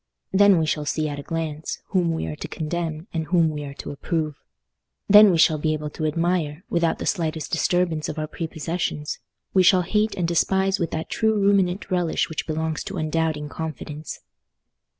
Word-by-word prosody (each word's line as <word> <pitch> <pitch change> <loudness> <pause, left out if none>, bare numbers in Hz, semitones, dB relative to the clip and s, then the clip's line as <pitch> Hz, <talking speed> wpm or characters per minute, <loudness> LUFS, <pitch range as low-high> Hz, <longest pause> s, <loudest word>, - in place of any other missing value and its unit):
Then 200 -1 +6
we 160 - +2
shall 150 -1 -1
see 155 +1 0
at 145 0 -5
a - - -4
glance 160 0 -4
whom 180 -4 +2
we 160 - -2
are - - -4
to - - -6
condemn 160 0 -3
and 160 -2 -1
whom 170 -2 +3
we 150 -1 -5
are 140 0 -8
to - - -7
approve. 155 +1 -2 0.7
Then 210 +1 +9
we 175 - +3
shall 155 -1 +4
be 155 +1 +1
able 150 -1 -4
to 155 0 -2
admire, 165 0 -1
without 170 -1 +1
the - - -5
slightest 160 -4 -1
disturbance 170 -2 +1
of 155 - -5
our 155 - -1
prepossessions: 160 -1 -3 0.3
we 190 - +5
shall 180 0 +5
hate 210 +4 +1
and 175 -2 0
despise 190 +3 +2
with 170 - 0
that 160 0 -4
true 220 -1 +2
ruminant 195 -2 +2
relish 175 -3 +1
which 160 - -4
belongs 160 0 -2
to 200 -2 -5
undoubting 155 -1 -1
confidence." 155 0 -6
165 Hz, 190 wpm, -24 LUFS, 155-180 Hz, 0.7 s, Then